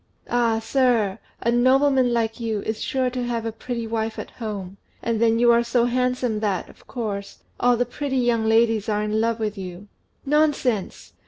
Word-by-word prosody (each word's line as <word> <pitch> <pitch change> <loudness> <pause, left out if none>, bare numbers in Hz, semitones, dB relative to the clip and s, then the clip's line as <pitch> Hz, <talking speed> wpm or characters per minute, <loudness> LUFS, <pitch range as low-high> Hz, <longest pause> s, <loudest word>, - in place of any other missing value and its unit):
"Ah, 235 -2 +2
sir, 225 -4 +1 0.2
a 235 - +1
nobleman 260 +1 +4
like 225 -1 -1
you 220 -3 -2
is 220 0 -3
sure 260 -1 0
to 250 0 -3
have 235 -2 -2
a 225 - -1
beautiful 235 +1 -5
wife 225 0 -2
at - - -7
home; 200 -4 -6 0.3
and 230 -1 -1
then 230 -1 +4
you 240 0 +5
are 235 0 +4
so 235 0 +2
handsome 250 -2 0
that, 205 -4 -1
of - - -19
course, 205 -5 -5 0.2
all 245 -1 +3
the 245 - +1
pretty 265 +2 -3
young 235 -3 +2
ladies 225 -1 +3
are 210 0 0
in 215 +1 0
love 230 0 0
with 210 -2 -3
you." 185 +1 -8 0.4
"Nonsense! 280 -8 0
230 Hz, 185 wpm, -23 LUFS, 220-245 Hz, 0.4 s, you